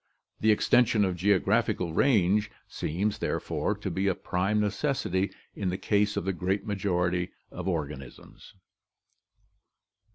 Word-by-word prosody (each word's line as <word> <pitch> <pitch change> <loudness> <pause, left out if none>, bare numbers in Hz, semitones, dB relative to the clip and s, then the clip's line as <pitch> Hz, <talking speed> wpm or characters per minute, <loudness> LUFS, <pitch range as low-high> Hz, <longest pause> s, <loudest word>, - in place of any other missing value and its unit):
The 110 - +2
extension 110 0 +3
of 90 -2 -1
geographical 90 -2 +1
range 105 -2 +3 0.2
seems, 100 +7 -2
there - - -1
fore, - - -2
to - - -5
be 95 +1 0
a 95 - +2
prime 95 +4 0
necessity 105 - 0 0.3
in 95 -3 -2
the 90 - -2
case 105 0 +1
of - - -2
the 95 - 0
great 95 +3 -1
majority 90 -4 0 0.2
of 90 +1 -6
organisms. 75 -6 -6
95 Hz, 130 wpm, -28 LUFS, 90-105 Hz, 0.3 s, extension